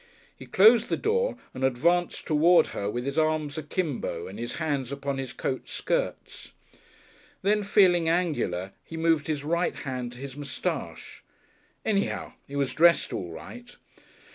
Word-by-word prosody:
He - - -12
closed 220 +4 +6
the - - 0
door 470 +3 0 0.2
and 130 - -5
advanced 165 +8 +1
toward 165 +3 +5
her 100 - -2
with 120 +3 -3
his 140 +3 0
arms 155 -2 0
akimbo 145 - -3
and 100 +3 -9
his 120 0 -3
hands 145 -6 -2
upon 140 -1 -3
his 130 -2 -4
coat 130 - -4
skirts. - - -3 0.9
Then, 210 +2 +3
feeling 185 -5 +4
angular, 140 - 0
he 165 - -8
moved 165 -3 +2
his 150 -3 -2
right 170 +4 0
hand 125 -3 -4
to - - -12
his 135 0 -8
moustache. 145 -2 -5 0.6
Anyhow, 205 -2 -1
he 140 - -8
was 140 -2 0
dressed 170 -1 +4
all 90 - -4
right. 245 - -10
155 Hz, 150 wpm, -27 LUFS, 130-175 Hz, 0.9 s, closed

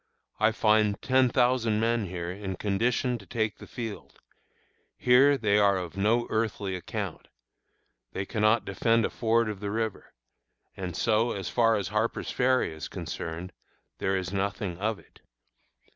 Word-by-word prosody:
I 110 +1 +4
find 110 -1 +2
ten 130 -1 +3
thousand 120 -3 +2
men 115 -2 +1
here 85 -1 -4
in 95 0 -5
condition 120 +5 0
to 100 - -15
take 110 -3 -2
the - - -11
field. 115 -4 -7 0.8
Here 135 +3 +5
they 105 -4 +2
are 100 -2 +4
of 90 -2 -5
no 110 +5 +2
earthly 105 -3 -1
account. 90 - -5 0.8
They 95 - -3
cannot 110 +1 +2
defend 115 +3 +2
a - - -3
ford 115 0 +1
of 105 -2 -4
the 100 0 -4
river; 110 0 -3 0.6
and, 90 -3 -5
so 110 -3 +1
far 115 +4 +2
as 100 -4 -2
Harper's 110 +2 -1
Ferry 130 -8 +2
is 80 0 -6
concerned, 85 +3 -6 0.5
there 95 0 +1
is 95 +1 -4
nothing 100 -2 -2
of 110 +1 -1
it. - - -21
110 Hz, 150 wpm, -28 LUFS, 95-115 Hz, 0.8 s, Here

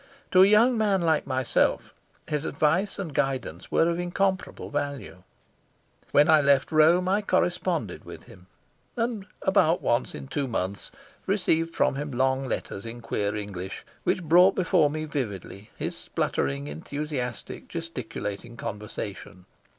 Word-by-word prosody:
To 185 - +7
a 190 - +8
young 225 +3 +5
man 200 -4 +2
like 160 -3 +2
myself 130 -2 +1 0.3
his 150 -1 -1
advice 165 +7 +1
and 180 -7 -5
guidance 130 -12 -2
were 165 - +4
of 170 0 0
incomparable 185 +2 -1
value. 145 -9 -4 0.9
When 145 +1 +5
I 155 -1 +6
left 140 0 +3
Rome 165 +4 +5
I 200 +3 +2
corresponded 175 - 0
with - - -10
him, 90 0 -16 0.5
and 230 -4 -2 0.2
about 190 -4 +3
once 120 +2 0
in - - -7
two 140 0 -2
months 100 -4 -3 0.4
received 165 -4 +1
from 135 - +2
him 145 +1 -3
long 130 +1 +1
letters 100 -5 -4
in 115 +1 -8
queer 105 -2 -2
English, 100 -3 -6 0.2
which 185 - 0
brought 180 +4 +6
before 170 -4 +3
me 155 +1 -3
vividly 105 - -5
his - - -3
spluttering, 70 0 -2
enthusiastic, 125 - -5
gesticulating 120 -8 -6
conversation. 105 -3 -7
145 Hz, 140 wpm, -26 LUFS, 115-175 Hz, 0.9 s, a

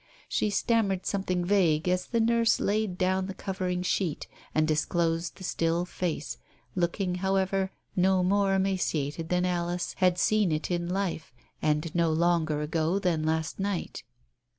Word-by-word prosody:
She 215 - 0
stammered 205 -3 +1
something 185 -3 -1
vague 175 -5 +2
as 180 0 +1
the 235 - 0
nurse 230 0 +3
laid 205 -2 0
down 185 +1 +1
the 195 - -6
covering 185 -2 -2
sheet, 180 -4 -1 0.3
and 155 0 +3
disclosed 165 +2 0
the 185 - -11
still 170 0 0
face, 175 -4 -3 0.4
looking, 180 +1 0
however, 190 0 +1 0.2
no 185 0 +3
more 195 +1 +2
emaciated 165 -5 -1
than 180 0 +2
Alice 175 0 -1
had 180 -2 +3
seen 210 -1 +2
it 155 +3 -2
in 175 0 -1
life 185 -4 -2 0.3
and 155 +1 0
no 170 -2 +2
longer 160 -2 +1
ago 160 +4 0
than 175 -6 0
last 160 +2 -1
night. 195 -2 -3
180 Hz, 150 wpm, -28 LUFS, 165-195 Hz, 0.4 s, nurse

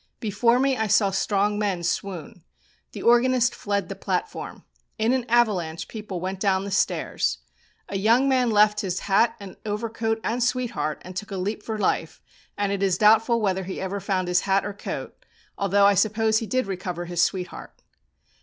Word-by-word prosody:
Before 230 +3 +2
me 270 +1 +2
I 220 -3 -1
saw 200 -1 +3
strong 205 +1 0
men 195 -5 -1
swoon. 175 -2 -4 0.5
The - - -7
organist 245 +1 +4
fled 200 -1 -2
the - - -6
platform. - - -4 0.3
In 220 +3 +2
an 250 -2 -1
avalanche 195 -9 +1
people 210 -5 -6
went 185 +2 -4
down 190 -1 +1
the 200 - -5
stairs. 65 - 0 0.5
A 195 - -3
young 230 +6 +4
man 255 -3 +2
left 210 -1 +4
his 185 -2 -3
hat 205 +4 +2
and 200 -2 -10
overcoat 225 +1 -2
and 240 +2 0
sweetheart, 240 - -2
and 185 0 -9
took 205 +3 -5
a 195 - -4
leap 205 +4 -3
for 220 0 -4
life, 185 -5 -1 0.4
and 205 -1 0
it 200 -1 -2
is 190 -3 +2
doubtful 225 +3 +4
whether 190 -2 0
he 190 - -5
ever 190 +1 -3
found 190 -2 -1
his 180 0 +2
hat 195 0 +3
or 205 - -4
coat, 200 - -7 0.3
although, 200 0 +3
I 200 - +6
suppose, 220 +2 +2
he 225 - -5
did 255 +1 0
recover 180 -2 -4
his 175 0 -1
sweetheart. 180 -1 -3
205 Hz, 180 wpm, -24 LUFS, 190-225 Hz, 0.5 s, I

